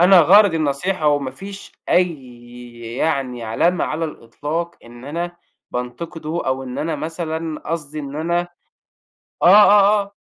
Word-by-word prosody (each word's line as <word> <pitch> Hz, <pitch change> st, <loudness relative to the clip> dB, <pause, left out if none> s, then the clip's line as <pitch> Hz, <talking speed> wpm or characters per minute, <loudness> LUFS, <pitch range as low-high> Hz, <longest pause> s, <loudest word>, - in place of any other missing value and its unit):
أنا 180 Hz, 0 st, +8 dB
غرضي 190 Hz, +1 st, +6 dB
النصيحة 155 Hz, +3 st, -1 dB
وما 145 Hz, -3 st, +1 dB
فيش 195 Hz, +9 st, -10 dB, 0.2 s
أي 125 Hz, -8 st, -2 dB, 0.2 s
يعني 135 Hz, -6 st, -1 dB
علامة 165 Hz, +11 st, +1 dB
على 155 Hz, +2 st, -2 dB
الإطلاق 155 Hz, +5 st, -5 dB
إن 120 Hz, +1 st, -13 dB
أنا 170 Hz, +4 st, -4 dB, 0.3 s
بانتقده 155 Hz, +6 st, -4 dB
أو 130 Hz, 0 st, -1 dB
إن 125 Hz, -1 st, -6 dB
أنا 155 Hz, -1 st, -2 dB
مثلًا 160 Hz, 0 st, -4 dB
قصدي 155 Hz, -2 st, -4 dB
إن 140 Hz, 0 st, -7 dB
أنا 170 Hz, +2 st, 0 dB, 1.0 s
آه، -, -, +5 dB
آه، 205 Hz, +1 st, +7 dB
آه، 200 Hz, -, -13 dB
155 Hz, 135 wpm, -20 LUFS, 135-175 Hz, 1.0 s, أنا